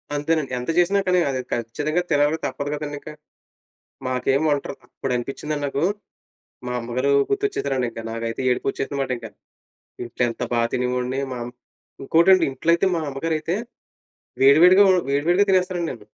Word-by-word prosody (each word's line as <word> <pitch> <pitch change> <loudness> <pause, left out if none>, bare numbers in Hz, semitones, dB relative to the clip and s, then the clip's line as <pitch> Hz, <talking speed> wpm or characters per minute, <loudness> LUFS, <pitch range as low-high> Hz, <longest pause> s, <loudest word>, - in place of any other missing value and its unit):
అంతేనండి. 150 -1 -1
ఎంత 125 - -6
చేసినా 195 +3 +3
కానీ, 180 0 +3
అది 130 -1 -2
ఖచ్చితంగా 145 +9 -1
తినాలి, 145 +2 +3
తప్పదు 145 0 -3
కదండింక. 145 0 -6 1.0
మాకేం 130 +2 +1
వంటరా 145 -1 -1
అప్పుడు 135 - -4
అనిపించిందండి 145 +4 -4
నాకు, 140 +2 -2 0.8
మా - - -3
అమ్మగారు 125 +4 -1 0.2
గుర్తొచ్చేసారండింక. 140 - -1
నాకైతే 115 +1 -4
ఏడుపొచ్చేసిందిమాటింక. 135 -1 -2 0.8
ఇంట్లో 120 +1 -4
ఎంత 115 - -6
బాగా 115 -1 +2
తినేవోణ్ణి. 125 +1 -1
మాం 120 -1 -5 0.6
ఇంకోటండి, 170 +4 +5
ఇంట్లో 160 +5 -1
అయితే, 180 +3 +1
మా 165 - -2
అమ్మగారైతే, 160 +5 -2 0.9
వేడివేడిగా 175 +9 +7
వొ 185 - +6 0.2
వేడి 140 +1 0
వేడిగా 195 +3 +4
తినేస్తానండి 185 -2 +1
నేను. 115 -5 -11
140 Hz, 130 wpm, -22 LUFS, 125-165 Hz, 1.0 s, వేడివేడిగా